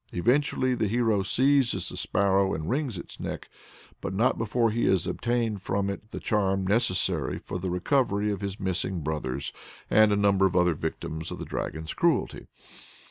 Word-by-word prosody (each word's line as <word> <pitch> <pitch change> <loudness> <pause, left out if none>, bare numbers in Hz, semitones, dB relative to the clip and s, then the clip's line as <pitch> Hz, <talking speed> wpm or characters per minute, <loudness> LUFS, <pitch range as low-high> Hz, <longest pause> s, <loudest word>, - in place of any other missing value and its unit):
Eventually 130 +5 +1
the 115 -3 0
hero 110 -2 +2
seizes 135 +5 +2
the - - -8
sparrow 95 0 +2
and 80 0 -5
wrings 130 -4 -1
its - - -10
neck, - - -5 0.5
but 95 - -4
not 115 +5 +3
before 115 +1 +1
he 115 +2 0
has 95 -3 +2
obtained 115 -4 -1
from 100 +1 -1
it 105 +2 -8
the - - -6
charm 95 -2 0
necessary 90 - +1
for 90 - -6
the 95 +1 -3
recovery 105 +2 +1
of 100 -1 -4
his 100 0 -4
missing 95 -2 -2
brothers 75 -4 -3 0.4
and 110 0 +6
a - - +3
number 100 -1 +4
of 95 - -4
other 90 -1 +4
victims 80 +1 -4
of - - -6
the - - -6
dragon's 80 0 -4
cruelty. - - 0
100 Hz, 175 wpm, -27 LUFS, 90-115 Hz, 0.5 s, and